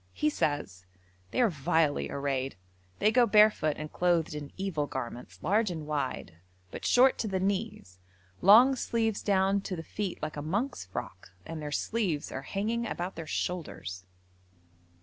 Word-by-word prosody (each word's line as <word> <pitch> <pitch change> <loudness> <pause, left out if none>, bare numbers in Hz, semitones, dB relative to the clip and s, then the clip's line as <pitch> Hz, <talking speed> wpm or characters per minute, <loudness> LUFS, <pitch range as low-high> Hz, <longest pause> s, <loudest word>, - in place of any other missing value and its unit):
He 150 +11 +1
says: 100 -14 -2 0.4
'They 105 - 0
are 235 - +5
vilely 150 0 +1
arrayed. 135 -2 -2 0.4
They 215 - +3
go 240 +1 +5
barefoot 210 -9 +5
and 155 0 -7
clothed 175 -3 +1
in 145 -1 -6
evil 180 -7 -2
garments, 125 -2 -6
large 210 +2 +2
and 160 -4 -5
wide, 135 - -3 0.3
but - - -7
short 260 +2 +5
to 220 - -1
the 190 -2 -1
knees, 195 - -3 0.4
long 235 +8 +8
sleeves 225 -4 -1
down 195 0 +2
to 195 - -4
the 165 - -6
feet 200 +2 -4
like 155 -1 -5
a - - -3
monk's 200 - -2
frock, 95 0 -7 0.2
and 165 -1 -6
their 150 -1 -5
sleeves 180 -4 -1
are 135 - -4
hanging 225 +9 -2
about 180 -2 -4
their 165 -1 -7
shoulders.' 95 - -4
170 Hz, 160 wpm, -29 LUFS, 145-210 Hz, 0.4 s, long